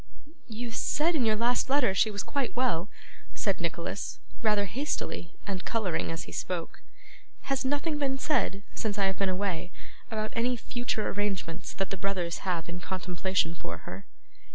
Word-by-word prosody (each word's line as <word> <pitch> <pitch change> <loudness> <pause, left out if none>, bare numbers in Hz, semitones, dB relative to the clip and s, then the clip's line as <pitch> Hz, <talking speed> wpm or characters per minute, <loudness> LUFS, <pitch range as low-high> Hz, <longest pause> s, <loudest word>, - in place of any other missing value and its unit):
'You 235 +1 -4
said 310 +8 +2
in 280 -7 +3
your 215 - +5
last 240 +3 +2
letter 275 -4 +5
that - - +1
she 215 - +5
was 205 -2 -2
quite 280 -4 -1
well,' 220 -7 +2 0.5
said - - +1
Nicholas, - - -2 0.2
rather 210 -3 +4
hastily, 195 - -2
and 190 -2 -2
colouring 210 -9 0
as 165 - -3
he - - -9
spoke. 175 -3 -3 0.6
'Has 275 -2 0
nothing 290 +3 +1
been 270 -2 +1
said, 205 -9 +1
since 215 -2 -1
I 200 - +4
have 190 0 0
been 195 -1 +3
away, 185 -2 0 0.4
about 215 -2 -2
any 245 +2 +2
future 240 -2 -1
arrangements 195 -4 -1
that 195 -3 -1
the 195 - -1
brothers 180 -3 -1
have 170 -3 0
in 170 +1 -4
contemplation 185 -1 0
for 85 - -6
her? 95 +2 -7
205 Hz, 170 wpm, -30 LUFS, 180-245 Hz, 0.6 s, your